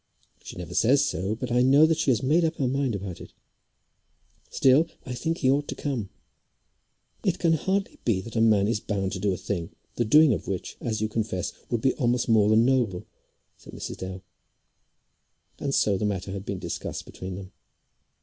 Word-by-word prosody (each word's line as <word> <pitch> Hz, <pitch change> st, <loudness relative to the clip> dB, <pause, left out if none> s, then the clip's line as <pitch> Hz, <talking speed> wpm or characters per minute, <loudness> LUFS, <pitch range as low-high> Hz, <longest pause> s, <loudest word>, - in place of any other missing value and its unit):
She -, -, -9 dB
never 90 Hz, -2 st, -7 dB
says 140 Hz, +5 st, +4 dB
so, 95 Hz, -, -2 dB
but 125 Hz, +1 st, -5 dB
I 120 Hz, +1 st, +3 dB
know 140 Hz, +4 st, +6 dB
that 160 Hz, 0 st, +1 dB
she 150 Hz, -, +1 dB
has 120 Hz, -3 st, +2 dB
made 155 Hz, +6 st, +3 dB
up 165 Hz, 0 st, 0 dB
her 135 Hz, -, 0 dB
mind 135 Hz, -3 st, 0 dB
about 95 Hz, -3 st, -6 dB
it. -, -, -12 dB, 1.2 s
Still 135 Hz, +5 st, +4 dB, 0.2 s
I 125 Hz, -, -5 dB
think 165 Hz, +7 st, -2 dB
he 130 Hz, -5 st, +2 dB
ought 145 Hz, +1 st, +1 dB
to -, -, -5 dB
come." 125 Hz, -9 st, -3 dB, 1.1 s
"It 185 Hz, -2 st, +1 dB
can 165 Hz, -2 st, +2 dB
hardly 190 Hz, +5 st, -1 dB
be 110 Hz, -6 st, +1 dB
that 115 Hz, +4 st, -10 dB
a 115 Hz, -, +2 dB
man 105 Hz, -3 st, +4 dB
is 110 Hz, -1 st, 0 dB
bound 100 Hz, -3 st, -2 dB
to 95 Hz, -, -4 dB
do 100 Hz, +1 st, +1 dB
a 90 Hz, -, -2 dB
thing, 95 Hz, -3 st, -4 dB, 0.3 s
the 120 Hz, -, +2 dB
doing 150 Hz, +4 st, +6 dB
of -, -, -4 dB
which, 95 Hz, -2 st, -4 dB
as 110 Hz, -3 st, -2 dB
you 110 Hz, -, +1 dB
confess, 105 Hz, -4 st, -3 dB, 0.2 s
would 120 Hz, -3 st, -1 dB
be 130 Hz, -, +3 dB
almost 125 Hz, -2 st, +1 dB
more 110 Hz, -3 st, +4 dB
than 110 Hz, +2 st, +5 dB
noble," 120 Hz, -9 st, +1 dB, 0.5 s
said -, -, -14 dB
Mrs. -, -, -6 dB
Dale. 95 Hz, 0 st, -7 dB, 1.4 s
And 140 Hz, -, -2 dB
so 100 Hz, -3 st, +2 dB
the 105 Hz, -, 0 dB
matter 95 Hz, -2 st, -2 dB
had 100 Hz, 0 st, -6 dB
been 100 Hz, -, -2 dB
discussed -, -, -5 dB
between 95 Hz, 0 st, -7 dB
them. 95 Hz, 0 st, -9 dB
115 Hz, 200 wpm, -26 LUFS, 100-135 Hz, 1.4 s, know